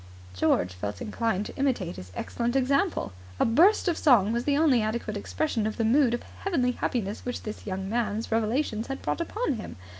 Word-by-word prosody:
George 90 0 +1
felt 100 +2 -5
inclined 210 -2 -1
to - - -8
imitate 245 -11 0
his 90 0 -9
excellent 240 +1 -2
example. 270 - +1 0.3
A - - +4
burst 355 - +4
of 340 -2 +1
song 230 - +5
was 235 +1 -1
the 285 -1 +2
only 290 -7 +4
adequate 215 0 -2
expression 225 +1 -1
of 215 - -4
the 225 - +1
mood 245 +1 +4
of - - -7 0.2
heavenly 275 -11 +1
happiness 220 -4 -2
which 245 - -4
this 215 0 -7
young 190 0 -3
man's 220 0 -1
revelations 225 +1 0
had 270 0 -5
brought - - -1
upon 425 - -1
him. 215 - -7
235 Hz, 190 wpm, -27 LUFS, 210-275 Hz, 0.3 s, song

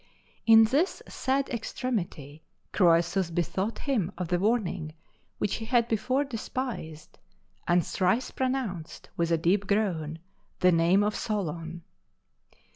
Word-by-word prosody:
In 225 0 +9
this 280 - +1
sad 270 +1 -1
extremity, 175 - -4 0.3
Croesus 170 0 +3
bethought 180 +6 -2
him 220 - -1
of 180 -2 -4
the 175 - +1
warning 185 -7 0 0.4
which 205 - -1
he 225 - -6
had 235 0 +2
before 250 +5 +1
despised, 230 - -6 0.5
and 175 -1 +3
thrice 190 +7 0
pronounced, 255 -11 -3
with 170 -1 0
a 165 - +3
deep 190 +5 +1
groan, 175 -7 0 0.4
the 180 - +6
name 170 +4 +4
of 210 0 0
Solon. 170 -6 -3
195 Hz, 120 wpm, -28 LUFS, 170-235 Hz, 0.5 s, In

